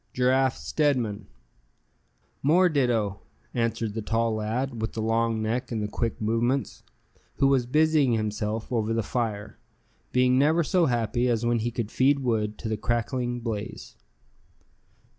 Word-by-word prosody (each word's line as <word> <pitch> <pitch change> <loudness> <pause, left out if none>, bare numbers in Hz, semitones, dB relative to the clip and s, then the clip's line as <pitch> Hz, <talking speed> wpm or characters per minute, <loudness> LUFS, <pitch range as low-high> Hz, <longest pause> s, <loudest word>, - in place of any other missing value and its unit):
"Giraffe 130 +1 +2
Stedman." 120 -9 -1 1.1
"More 175 +6 +4
ditto," 115 - 0 0.3
answered 115 -2 -1
the 110 - -3
tall 115 +1 0
lad, 115 +3 -2
with 110 - -3
the - - -5
long 115 0 +1
neck, 115 +4 -2
and 115 - -1
the - - -1
quick 115 +2 -3
movements, 115 +5 0 0.5
who 140 - +2
was 135 -3 +3
busying 150 -2 +3
himself 110 +1 -2
over 115 -2 0
the 115 - 0
fire, 105 -2 -3 0.5
being 125 0 +3
never 160 +4 +3
so 175 +1 +2
happy 120 0 0
as 120 -1 0
when 120 0 +2
he 115 +2 -1
could 115 -2 -4
feed 135 +2 +3
wood 110 -5 -1
to 115 - -6
the 110 -1 -1
crackling 120 +2 -1
blaze. 110 -2 -5
120 Hz, 145 wpm, -26 LUFS, 110-130 Hz, 1.1 s, More